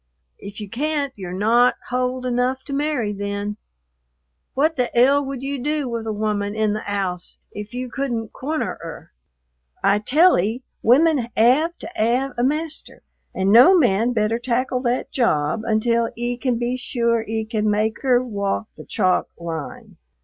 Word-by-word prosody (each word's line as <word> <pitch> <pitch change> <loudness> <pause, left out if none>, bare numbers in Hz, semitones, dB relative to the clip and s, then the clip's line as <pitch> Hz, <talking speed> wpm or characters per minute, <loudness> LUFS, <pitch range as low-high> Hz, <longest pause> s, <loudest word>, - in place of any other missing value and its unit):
"If 200 +1 -9
you 210 - -6
can't, 280 +4 -2
you're 185 -3 -7
not 235 +5 +4
hold 255 0 -1
enough 250 +1 0
to 280 - -7
marry 280 -7 -1
then. 205 +1 -4 1.0
What 310 +4 +2
the 250 -2 0
'ell 275 +4 +5
would 270 -1 -5
you 275 0 -3
do 295 0 -1
with 230 -2 -4
a - - -1
woman 210 -1 -2
in 215 -1 +1
the 215 - -3
'ouse 185 -3 -3
if 210 +3 -8
you 250 +1 -3
couldn't 240 -3 -3
corner 305 +4 -3
'er? 165 -1 -9 0.7
I 200 +1 +4
tell 310 - +4
'e, 220 +8 -2 0.2
women 275 0 +4
'ave 270 +9 +4
to - - -6
'ave 250 +5 +1
a 240 - -1
master, 305 +4 -2 0.3
and 190 +1 +1
no 255 - +8
man 235 - +3
better 225 0 0
tackle 255 +1 0
that 245 0 -1
job 155 - +1
until 230 +1 +1
'e 240 +1 -2
can 250 -2 0
be 245 +2 -1
sure 235 -2 0
'e 220 0 -3
can 215 -1 -1
make 215 +3 0
'er 255 -2 +3
walk 205 -2 -2
the - - -11
chalk 185 -4 +1
line." 165 -3 -7
235 Hz, 165 wpm, -22 LUFS, 210-260 Hz, 1.0 s, no